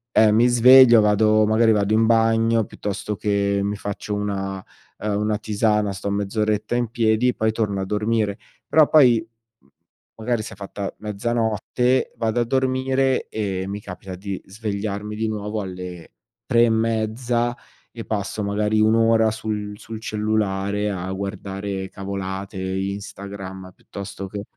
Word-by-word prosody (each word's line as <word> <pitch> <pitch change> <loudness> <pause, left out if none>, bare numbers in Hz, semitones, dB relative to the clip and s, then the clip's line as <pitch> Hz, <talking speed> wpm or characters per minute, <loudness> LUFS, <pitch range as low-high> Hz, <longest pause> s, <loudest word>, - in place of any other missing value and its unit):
eh, 110 -1 +6
mi 115 +3 +4
sveglio, 120 -1 +8
vado 110 +1 +4
magari 110 +1 +4
vado 105 -1 +1
in 110 +1 +4
bagno, 115 0 +3
piuttosto 105 +1 -4
che 100 -1 0
mi 100 +1 -1
faccio 100 0 -5
una, 95 -2 -3 0.4
uhm, 105 -1 -1
una 105 0 0
tisana 105 -1 +1
sto 100 +1 -4
mezz'oretta 105 +2 -1
in 120 -2 0
piedi, 115 +1 +2
poi 110 0 0
torno 105 -3 -1
a - - -2
dormire. 105 0 0 0.3
Però 155 -2 +5
poi, 120 -7 +5 0.3
mhmm, 70 - -30 0.5
magari 115 0 -1
si - - -8
è - - -11
fatta 100 0 -6
mezzanotte, 115 +4 0
vado 115 +1 0
a - - +3
dormire 130 +1 +1
e 95 -4 -3
mi 100 +1 -5
capita 95 -1 -8
di 95 0 -5
svegliarmi 105 0 -4
di 110 +1 -1
nuovo 105 0 -3
alle 90 -3 -8 0.3
3 120 0 +4
e - - +2
mezza 115 +2 0 0.4
e 115 - -7
passo 105 0 -3
magari 105 +1 +1
1 110 +1 +4
ora 115 -1 +4
sul 105 -2 -4
sul 110 -1 -8
cellulare 105 -2 -1
a 95 -1 -4
guardare 100 0 -4
cavolate, 95 0 -5
Instagram, 95 0 -5
piuttosto 100 0 -8
che 100 +1 -6
105 Hz, 145 wpm, -22 LUFS, 100-115 Hz, 0.5 s, sveglio